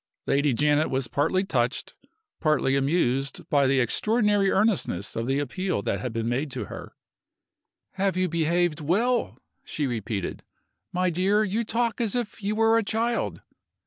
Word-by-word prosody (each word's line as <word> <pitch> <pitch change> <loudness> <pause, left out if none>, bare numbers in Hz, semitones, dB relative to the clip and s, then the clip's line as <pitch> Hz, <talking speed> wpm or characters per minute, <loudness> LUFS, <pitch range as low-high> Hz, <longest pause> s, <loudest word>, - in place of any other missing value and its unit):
Lady 145 +1 +2
Janet 150 +4 +2
was 130 -1 -1
partly 165 +9 +1
touched, 125 -8 -1 0.5
partly 150 -4 +2
amused, 135 -2 0
by 140 -2 +4
the 135 0 +3
extraordinary 205 - +2
earnestness 190 - 0
of 115 +1 -2
the 135 +1 +1
appeal 145 - -2
that 100 - -1
had 125 - -3
been 115 0 -2
made 130 +5 -1
to 125 -4 -4
her. - - -9 1.0
"Have 195 -1 -1
you 185 0 +2
behaved 170 0 +1
well?" 225 - +1 0.3
she 150 - -3
repeated. 110 -6 -3 0.5
"My 180 0 +1
dear, 195 +5 +2
you 215 +3 -1
talk 230 +1 -1
as 225 -2 0
if 235 -2 -3
you 205 +1 -1
were 225 +1 +4
a - - -1
child!" 230 +3 -1
165 Hz, 155 wpm, -26 LUFS, 135-205 Hz, 1.0 s, by